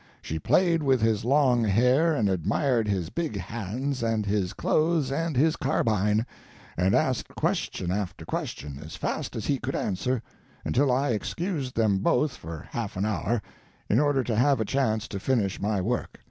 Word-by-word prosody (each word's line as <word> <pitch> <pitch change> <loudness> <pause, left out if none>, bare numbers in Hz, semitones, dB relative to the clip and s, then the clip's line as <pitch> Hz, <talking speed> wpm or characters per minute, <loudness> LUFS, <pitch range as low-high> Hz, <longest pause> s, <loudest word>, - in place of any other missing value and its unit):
She 80 - -4
played 170 - +3
with 135 -3 +3
his 110 -1 +1
long 125 -2 +3
hair, 125 +10 +3
and 110 -7 +2
admired 105 - +1
his 95 -4 -1
big 165 -10 -2
hands 115 +7 -3
and 115 -2 0
his 100 -3 0
clothes 155 -3 +1
and 165 +2 -1
his 155 +4 +4
carbine, 110 -4 +1 0.5
and 90 +3 +2
asked 130 -2 0
question 90 - -1
after 95 -1 -3
question, 70 -1 -4
as 80 - -8
fast - - -3
as - - -4
he - - +1
could - - -3
answer, 115 +6 -1 0.4
until 135 +1 +2
I 135 +3 +1
excused 140 - -2
them 105 -4 +2
both 130 +8 +2
for 80 -5 -9
half 110 -5 -4
an 95 - 0
hour, 110 +1 -1 0.5
in - - +4
order 145 -3 +2
to 115 -2 -1
have 130 +3 +3
a 110 - 0
chance 110 -3 0
to 100 - -5
finish 105 -4 0
my 105 0 0
work. 115 +7 -2
115 Hz, 175 wpm, -27 LUFS, 100-135 Hz, 0.5 s, his